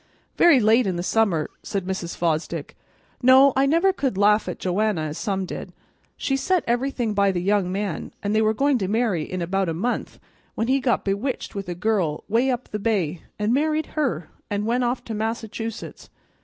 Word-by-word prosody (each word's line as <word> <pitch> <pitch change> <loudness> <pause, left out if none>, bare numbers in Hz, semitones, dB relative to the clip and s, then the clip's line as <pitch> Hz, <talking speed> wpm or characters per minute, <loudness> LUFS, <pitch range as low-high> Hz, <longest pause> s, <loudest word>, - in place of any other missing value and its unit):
"Very 335 -6 +6
late 225 +1 +4
in 185 - -1
the 175 - -3
summer," 190 -7 +1
said 200 -3 -3
Mrs. 185 -2 -4
Fosdick. 165 -2 -2 0.5
"No, 260 +2 +7
I 270 +1 +3
never 335 +6 +3
could 270 - -2
laugh 210 +1 +3
at - - -5
Joanna, 190 -1 0
as 155 0 -4
some 195 -2 -1
did. - - -7 0.4
She 270 - 0
set 360 +5 +1
everything 240 -2 0
by 200 -1 +3
the 180 - -2
young 190 0 +1
man, 195 -4 -3
an' 205 +1 0
they 215 - +3
were 220 0 +2
going 275 +1 +2
to 190 - -1
marry 215 -4 +1
in 180 +3 -4
about 190 +1 0
a 165 - -2
month, 235 +9 -3 0.4
when 225 - -1
he 270 +2 +3
got 250 -2 0
bewitched 205 +7 -2
with 195 -3 -5
a 175 - -3
girl 180 -5 0
'way 235 +5 +2
up 250 -1 -2
the 210 - -4
bay, 185 -7 -1 0.2
and 210 +2 +1
married 310 +3 +1
her, 220 - -1 0.2
and 205 0 -1
went 245 +3 +1
off 245 +1 -1
to 225 - -6
Massachusetts. 225 +1 -5
215 Hz, 195 wpm, -23 LUFS, 190-250 Hz, 0.5 s, No